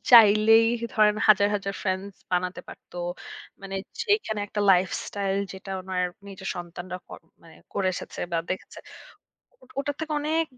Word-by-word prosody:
চাইলেই 225 -1 +8 0.3
ধরেন 210 -1 +5
হাজার, 205 -1 +7
হাজার 195 -1 -2
ফ্রেন্ডস 190 0 -2 0.2
বানাতে 180 0 0
পারত। - - -13 0.7
মানে 195 0 -5 0.3
যেখানে 410 - +1
একটা 210 +1 -3
lifestyle 195 +2 0
যেটা 195 +1 -9
উনার 185 -1 -1 0.2
নিজের 190 -1 -7
সন্তানরা 175 +1 -6
কর - - -9 0.2
মানে 165 -1 -15 0.2
করে 195 - 0
এসেছে - - -7
বা - - +2
দেখে 185 - -2
এসেছে। - - -10 0.8
ও - - -15
ওটার 285 0 -1
থেকে 320 -1 -3
অনেক 315 +2 +1
200 Hz, 145 wpm, -26 LUFS, 185-220 Hz, 0.8 s, চাইলেই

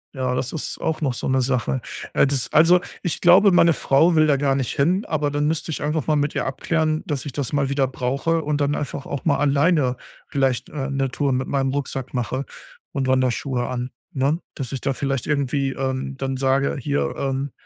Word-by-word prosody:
Ja, 130 -1 -1
das 125 0 -2
ist 160 - -5
auch 160 - -1
noch 135 -4 0
so - - -4
'ne 130 0 +2
Sache. 130 0 0 0.3
Äh, - - +4
das 135 -3 -1
also, 170 +3 +6 0.2
ich 175 - -2
glaube, 190 +4 +7
meine 170 -2 +5
Frau 155 +5 +3
will 155 0 +5
da 145 -2 +3
gar 135 -1 +1
nicht 135 -3 -2
hin, 180 +9 +2
aber 150 -3 0
dann 145 0 0
müsste 160 +2 -1
ich 155 - -3
einfach 150 -1 -1
mal 155 - +3
mit 145 0 0
ihr - - -1
abklären, 155 +3 0
dass 145 -5 -3
ich 145 - -4
das 140 0 -4
mal 140 -2 +1
wieder 140 -1 +1
brauche 135 +6 -1
und 150 0 -1
dann 145 0 +1
einfach 140 -1 -4
auch 140 - -5
mal 145 -4 +3
alleine 145 -2 +2 0.3
vielleicht, 135 -3 0
äh, 140 -2 -4
'ne 135 -1 -1
Tour 140 +1 0
mit 130 +1 -1
meinem 135 -1 0
Rucksack 135 -2 -4
mache 125 +3 -2 0.5
und 135 -2 -2
Wanderschuhe 130 -1 0
an, 125 0 -4 0.2
ne? 140 +1 0 0.2
Dass 135 -4 -5
ich 135 - -4
da 135 - 0
vielleicht 135 0 -2
irgendwie, 140 -2 0
ähm, 135 0 -3
dann 135 0 -2
sage: 135 +1 +1
„Hier, 145 +2 -1
ähm, 135 0 -2
140 Hz, 215 wpm, -22 LUFS, 130-150 Hz, 0.5 s, glaube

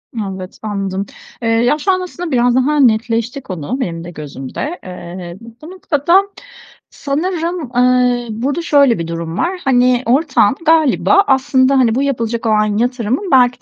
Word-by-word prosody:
Evet, 195 -4 -6
anladım. 195 -2 -3 0.4
Eee, 230 - -1
ya, 235 +5 +2
şu 380 +6 0
an 370 0 0
aslında 355 -2 -6
biraz 245 -1 +2
daha 290 +4 +2
netleşti 235 +1 +1
konu 185 - -5
benim 165 -9 -4
de 175 - -8
gözümde. 150 - -6
Eee, 175 -1 -8 0.2
bu 315 +3 -10
noktada 345 0 +2 0.7
sanırım, 330 0 -3
eee, 250 -1 +2
burada 270 +9 -2
şöyle 280 - +3
bir 165 - -4
durum 165 0 -5
var. 340 +11 0
Hani, 250 -1 +2
ortağın 260 -3 +2
galiba 320 +4 +4
aslında, 265 0 +3
hani, 230 -3 +2
bu 270 - +1
yapılacak 235 -4 -2
olan 215 -1 +1
yatırımın 245 - -1
belki 250 -1 +4
245 Hz, 150 wpm, -16 LUFS, 215-285 Hz, 0.7 s, galiba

